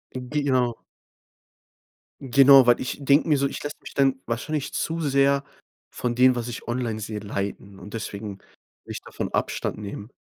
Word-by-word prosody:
Genau. 130 Hz, -2 st, 0 dB, 1.4 s
Genau, 135 Hz, 0 st, +7 dB
weil 120 Hz, -, +5 dB
ich 130 Hz, -, -3 dB
denke 140 Hz, +3 st, +3 dB
mir 150 Hz, -, +4 dB
so: 140 Hz, -, +1 dB
„Ich -, -, -7 dB
lasse 145 Hz, +2 st, -5 dB
mich -, -, -10 dB
dann 135 Hz, -1 st, +2 dB
wahrscheinlich 140 Hz, +5 st, -3 dB
zu 165 Hz, +1 st, -2 dB
sehr 140 Hz, -1 st, +2 dB, 0.5 s
von 120 Hz, -1 st, -2 dB
dem, 125 Hz, 0 st, +5 dB
was 120 Hz, 0 st, -3 dB
ich 120 Hz, -, -8 dB
online 120 Hz, -2 st, -2 dB
sehe 105 Hz, 0 st, -5 dB
leiten“, 100 Hz, -1 st, -5 dB
und 100 Hz, +4 st, -11 dB
deswegen 100 Hz, -2 st, -6 dB, 0.4 s
würde -, -, -10 dB
ich -, -, -6 dB
davon -, -, -6 dB
Abstand -, -, -1 dB
nehmen. 105 Hz, +3 st, -7 dB
125 Hz, 165 wpm, -24 LUFS, 110-140 Hz, 1.4 s, Genau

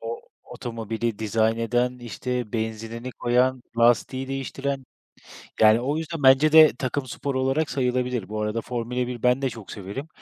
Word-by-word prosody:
o 115 Hz, +1 st, -5 dB, 0.2 s
otomobili 115 Hz, -1 st, -4 dB
dizayn 110 Hz, +1 st, +1 dB
eden, 120 Hz, +2 st, 0 dB
işte, 120 Hz, -1 st, -4 dB
benzinini 115 Hz, +2 st, -4 dB
koyan, 125 Hz, +1 st, +1 dB, 0.2 s
lastiği 120 Hz, +3 st, +2 dB
değiştiren. 135 Hz, 0 st, -3 dB, 0.8 s
Yani 110 Hz, +2 st, +6 dB
o 145 Hz, +4 st, -1 dB
yüzden 160 Hz, -2 st, -5 dB
bence 135 Hz, +4 st, +6 dB
de 155 Hz, -1 st, +9 dB
takım 130 Hz, +1 st, -2 dB
sporu 130 Hz, +1 st, -3 dB
olarak 135 Hz, +4 st, +1 dB
sayılabilir. 125 Hz, -5 st, -1 dB
Bu 110 Hz, 0 st, -3 dB
arada 105 Hz, +2 st, -1 dB
Formula 125 Hz, +1 st, -3 dB
1 125 Hz, -1 st, -6 dB
ben 125 Hz, +2 st, +3 dB
de 135 Hz, -, +1 dB
çok 115 Hz, -4 st, -10 dB
severim. 105 Hz, +9 st, -6 dB
125 Hz, 155 wpm, -24 LUFS, 115-130 Hz, 0.8 s, de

